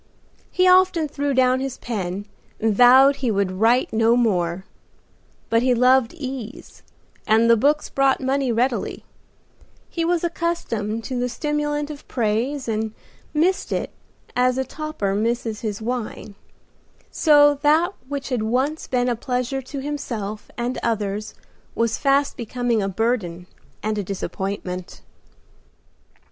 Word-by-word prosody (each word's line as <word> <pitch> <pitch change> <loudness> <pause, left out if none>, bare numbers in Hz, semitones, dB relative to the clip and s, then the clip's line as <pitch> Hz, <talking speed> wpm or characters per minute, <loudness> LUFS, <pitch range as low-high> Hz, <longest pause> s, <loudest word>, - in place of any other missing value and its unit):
He 365 0 +2
often 365 -3 +4
threw 285 -1 -2
down 255 0 +3
his 265 -1 -4
pen 200 -4 -4 0.3
and 220 -1 +1
vowed 260 +4 +7
he 260 -3 -1
would 200 -3 0
write 225 +7 +2
no 225 +1 +4
more; 185 -6 0 0.8
but 230 0 +2
he 250 0 +3
loved 255 +3 +3
ease 260 -7 -7 0.5
and 225 +2 +4
the 235 - +6
books 290 +6 +2
brought 275 -1 +2
money 265 -1 0
readily; 240 +2 -1 0.9
he 335 - -1
was 345 0 +1
accustomed 230 -11 -2
to 255 0 -3
the 250 0 -1
stimulant 295 +3 -2
of 290 -1 -11
praise 245 +4 -1
and 220 -1 -2 0.4
missed 345 +5 +1
it - - -2 0.4
as 250 0 +3
the 265 - 0
toper 305 -9 -3
misses 225 +1 -1
his 215 -1 -4
wine, 230 -3 -4 0.8
so 290 -2 +5
that 320 +6 +3
which 280 -1 -4
had 250 -4 -1
once 260 +8 -1
been 250 -1 0
a 245 - +1
pleasure 250 +3 -2
to 270 +2 -7
himself 235 -8 -5
and 240 +2 -2
others 210 -2 -2 0.4
was 230 -1 0
fast 280 0 +2
becoming 240 -1 -1
a 195 - -1
burden 190 -5 -1 0.4
and 215 0 -1
a - - -2
disappointment. 190 -1 -5
245 Hz, 135 wpm, -22 LUFS, 220-280 Hz, 0.9 s, vowed